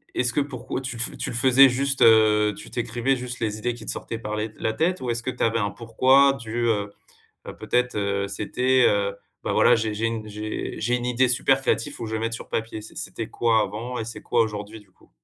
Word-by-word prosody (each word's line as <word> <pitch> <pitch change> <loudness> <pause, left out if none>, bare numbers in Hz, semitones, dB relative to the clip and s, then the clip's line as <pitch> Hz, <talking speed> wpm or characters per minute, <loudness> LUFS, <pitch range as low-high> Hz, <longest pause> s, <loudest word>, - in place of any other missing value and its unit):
est-ce 125 -1 +1
que 145 - +2
pour 130 -2 -5
tu 125 -2 -5 0.2
tu - - -2
le - - -6
faisais 130 +2 +6
juste, 135 +2 -1
heu, 105 -2 +5
tu - - -11
tu - - -4
écrivais 120 +3 0
juste 125 0 -6
les 110 -2 -1
idées 120 +3 -2
qui 115 -2 -11
te - - -3
sortaient 115 - -6
par 105 -2 -4
les 110 +1 -3
la 110 - -1
tête 175 +9 0
ou 125 - -3
est-ce 115 0 -2
que 130 - -2
tu 125 - -3
avais 115 0 +2
un 100 -1 -1
pourquoi 130 +5 +4
du, 120 -2 -3
heu 105 -3 0 0.6
heu, - - -7
peut-être, 125 0 0
heu, 100 -1 -1
c'était 125 +6 +1
heu, 100 -1 +1 0.3
bah, - - -1
voilà, - - +5
j'ai 110 -1 -1
j'ai 110 +2 -2
une 115 -1 -4
j'ai 105 +2 -3
1 120 - -5
idée 125 +1 +2
super 135 +2 +2
créatif, 115 -3 -1
faut 115 - -5
que 110 - -6
je 110 - -1
le 110 - -2
mette 115 0 -2
sur 115 - -8
papier. 110 -1 -3
C'est 110 - -12
c'était 115 -1 -5
quoi 115 -2 +2
avant 115 +5 -5
et 110 - -3
c'est 115 - -8
quoi 115 - +2
aujourd'hui, 105 0 -4
du 100 - -24
coup? - - -26
115 Hz, 250 wpm, -24 LUFS, 110-125 Hz, 0.6 s, faisais